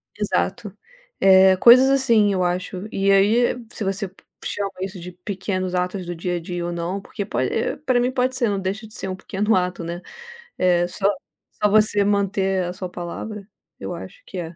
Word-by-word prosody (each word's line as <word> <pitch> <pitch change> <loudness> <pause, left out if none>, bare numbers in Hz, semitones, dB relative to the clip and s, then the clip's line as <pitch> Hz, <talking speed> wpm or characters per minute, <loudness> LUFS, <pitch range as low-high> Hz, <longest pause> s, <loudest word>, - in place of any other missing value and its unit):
Exato. 205 0 -2 0.4
Eh, 190 0 +6
coisas 255 +4 +8
assim 235 -7 +3
eu 185 -1 +1
acho. 180 +2 -2
E 195 0 +2
aí 215 +6 +4 0.2
se - - -5
você 195 +1 -1
p 190 - -21 0.2
chama 200 -1 -2
isso 190 -1 -5
de 180 +1 -8
pequenos 185 0 -4
atos 180 +1 -2
do 175 - -5
dia 175 +2 -2
a - - -2
dia 175 +1 -4
ou 175 - -3
não, 170 +3 -3
porque 200 +1 -6
po 120 - -3
eh, 130 - 0
para 260 -4 +1
mim 250 +1 +1
pode 255 0 0
ser, 240 -4 +1
não 200 - -1
deixa 200 +4 -4
de 215 - -11
ser - - -5
um 185 - -3
pequeno 205 +3 0
ato, 180 -1 -1
né, 170 +1 -5 0.6
eh, 175 -1 +3
só 195 +2 -1 0.6
só 210 - +5
você 210 -1 +4
manter 195 -2 +1
a 175 - -3
sua 185 0 -5
palavra, 195 +4 -7 0.3
eu - - -5
acho - - -10
que - - -8
é. 165 -1 -5
195 Hz, 200 wpm, -22 LUFS, 180-210 Hz, 0.6 s, coisas